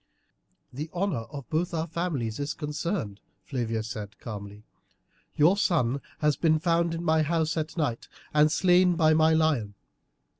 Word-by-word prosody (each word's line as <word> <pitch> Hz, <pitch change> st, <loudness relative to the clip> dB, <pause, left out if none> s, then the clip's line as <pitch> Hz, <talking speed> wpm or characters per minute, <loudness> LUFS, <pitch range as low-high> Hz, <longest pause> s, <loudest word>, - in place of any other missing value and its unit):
"The 150 Hz, +5 st, -5 dB
honour 175 Hz, -, -1 dB
of 140 Hz, -2 st, -8 dB
both 170 Hz, +2 st, 0 dB
our 160 Hz, 0 st, -1 dB
families 155 Hz, -9 st, -3 dB
is 145 Hz, +1 st, -3 dB
concerned," 150 Hz, -, -3 dB, 0.3 s
Flavia 115 Hz, -5 st, -2 dB
said 105 Hz, -2 st, -7 dB
calmly. 105 Hz, -2 st, -8 dB, 0.7 s
"Your 160 Hz, +6 st, +5 dB
son 140 Hz, -, +1 dB, 0.2 s
has 150 Hz, -1 st, +3 dB
been 155 Hz, +2 st, +3 dB
found 170 Hz, 0 st, +1 dB
in 165 Hz, -, -4 dB
my 160 Hz, -1 st, +3 dB
house 160 Hz, 0 st, 0 dB
at 160 Hz, +1 st, -3 dB
night 135 Hz, -8 st, -1 dB, 0.3 s
and 150 Hz, 0 st, +4 dB
slain 180 Hz, +1 st, +4 dB
by 155 Hz, -2 st, +4 dB
my 160 Hz, 0 st, +4 dB
lion. 145 Hz, -11 st, +1 dB
155 Hz, 150 wpm, -27 LUFS, 120-165 Hz, 0.7 s, Your